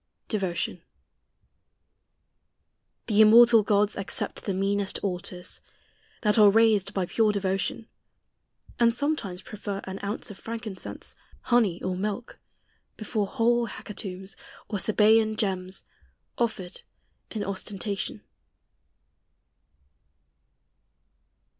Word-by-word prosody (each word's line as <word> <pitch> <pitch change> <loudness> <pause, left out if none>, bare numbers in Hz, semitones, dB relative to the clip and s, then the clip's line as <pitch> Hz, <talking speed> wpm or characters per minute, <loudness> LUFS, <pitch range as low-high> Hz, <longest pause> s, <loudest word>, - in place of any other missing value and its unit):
DEVOTION. 180 -4 -2 2.2
The 215 -1 +4
immortal 230 +1 +8
gods 205 0 +2
Accept 200 -1 -4
the 195 - -1
meanest 200 +1 0
altars, 180 -1 -3 0.6
that 210 +1 +4
are 210 -1 +9
raised 210 -2 +4
By 190 -2 +1
pure 215 +4 +2
devotion; 195 +2 -2 0.9
and 235 -1 +4
sometimes 235 -11 -2
prefer 205 -2 -5
An 190 0 -6
ounce 205 +1 -4
of 200 - -12
frankincense, 225 -4 -6 0.3
honey, 220 -8 +2
or 185 0 -1
milk, 210 +5 -4 0.6
Before 215 -1 -2
whole 240 0 +2
hecatombs, 190 -2 -6 0.3
or 205 - -2
Sabsean 215 +1 +4
gems, 190 -3 -2 0.5
Offered 205 -6 -2 0.5
in 215 -2 -3
ostentation. 195 +1 -4
205 Hz, 90 wpm, -27 LUFS, 190-225 Hz, 2.2 s, are